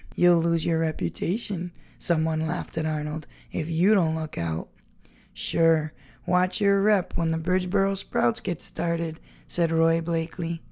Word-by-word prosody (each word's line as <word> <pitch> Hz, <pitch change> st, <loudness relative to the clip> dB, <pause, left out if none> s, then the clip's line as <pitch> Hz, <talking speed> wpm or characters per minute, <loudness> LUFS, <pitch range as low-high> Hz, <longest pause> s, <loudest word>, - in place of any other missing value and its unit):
"You'll 175 Hz, -1 st, +5 dB
lose 165 Hz, -1 st, +1 dB
your 165 Hz, -1 st, +1 dB
reputation," 175 Hz, +3 st, -2 dB, 0.3 s
someone 160 Hz, -1 st, +1 dB
laughed 175 Hz, +2 st, -4 dB
at 160 Hz, -1 st, -1 dB
Arnold, 150 Hz, 0 st, -4 dB, 0.2 s
"if 160 Hz, -1 st, -3 dB
you 175 Hz, +6 st, +4 dB
don't 165 Hz, -6 st, +3 dB
look 155 Hz, -1 st, -5 dB
out." 80 Hz, -1 st, -3 dB, 0.6 s
"Sure, 160 Hz, -2 st, +1 dB, 0.3 s
watch 180 Hz, +2 st, +2 dB
your 200 Hz, -1 st, +4 dB
rep 205 Hz, -3 st, +2 dB
when 165 Hz, -, 0 dB
the 160 Hz, 0 st, 0 dB
Bridgeboro 185 Hz, +3 st, +1 dB
Sprouts 120 Hz, -10 st, 0 dB
get 175 Hz, -4 st, -4 dB
started," 170 Hz, -1 st, -1 dB, 0.3 s
said 170 Hz, -2 st, 0 dB
Roy 165 Hz, 0 st, +3 dB
Blakeley. 165 Hz, 0 st, -3 dB
165 Hz, 145 wpm, -26 LUFS, 160-180 Hz, 0.6 s, You'll